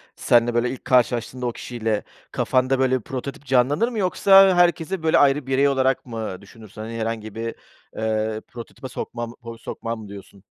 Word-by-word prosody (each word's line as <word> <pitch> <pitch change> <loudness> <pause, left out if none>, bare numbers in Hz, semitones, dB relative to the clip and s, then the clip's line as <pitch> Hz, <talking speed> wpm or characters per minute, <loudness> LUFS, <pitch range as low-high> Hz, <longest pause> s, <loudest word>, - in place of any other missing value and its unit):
seninle, 120 0 +3
böyle, 120 +1 +1
ilk 130 - -8
karşılaştığında 125 0 +1
o 120 - 0
kişiyle 115 -3 -3 0.3
kafanda, 130 +1 +1
böyle, 130 -1 +2
prototip 135 +4 -7
canlanır 135 - +2
mı? 230 -4 -4
Yoksa 195 0 +6
herkesi, 175 0 +2
böyle, 160 - +4
ayrı 140 -1 +3
birey 135 +1 +3
olarak 135 -1 +1
mı 110 -6 -5
düşünürsün? 110 +1 -13
Hani, 110 +1 -6
herhangi 110 -1 -4
bir, 115 0 -4 0.4
eee, 110 0 -1
prototipe 120 +2 -9
sokmam 120 -1 -6
ho 115 -1 -9
sokmam 115 0 -5
mı, 105 - -10
diyorsun? 100 -1 -12
120 Hz, 165 wpm, -23 LUFS, 115-135 Hz, 0.4 s, Yoksa